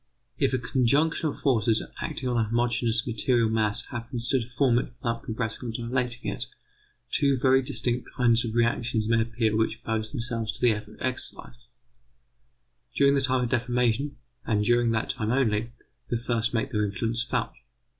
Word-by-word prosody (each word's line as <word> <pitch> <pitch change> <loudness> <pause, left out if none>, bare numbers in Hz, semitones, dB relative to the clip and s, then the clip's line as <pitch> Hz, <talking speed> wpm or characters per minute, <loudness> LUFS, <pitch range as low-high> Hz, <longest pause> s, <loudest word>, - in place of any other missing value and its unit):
If - - +2
a 130 - +1
conjunction 140 +6 +2
of - - -7
forces 115 -4 +2 0.2
acting 145 -5 -3
on 125 - 0
a 115 -2 +2
homogeneous 120 0 +1
material 120 -1 +2
mass 110 +1 0
happens 120 0 -3
to 135 - +3
deform 125 +1 +2
it - - -2
without 115 -3 -2
compressing 115 +1 -4
or - - -2
dilating 120 +1 -2
it, 120 - -4 0.7
two 140 -2 +2
very 135 +1 +4
distinct 125 0 -2
kinds 120 -2 +4
of 115 -1 -4
reactions 115 -2 +1
may 115 0 +3
appear 115 -1 0
which 110 0 +1
oppose 110 -1 -3
themselves 115 -4 -2
to - - -4
the 120 - +5
effort 105 0 -5
exercised. 125 -1 -5 1.3
During 140 0 +5
the 140 - +3
time 130 -2 +2
of 120 - -2
deformation, 125 +2 +1 0.3
and 105 -3 0
during 120 0 +3
that 115 -1 0
time 105 -1 -3
only, 115 -3 +1 0.4
the 120 - 0
first 115 -1 0
make 115 +2 -1
their 105 -3 +1
influence 115 +3 -1
felt. 120 - -1
120 Hz, 170 wpm, -27 LUFS, 115-125 Hz, 1.3 s, the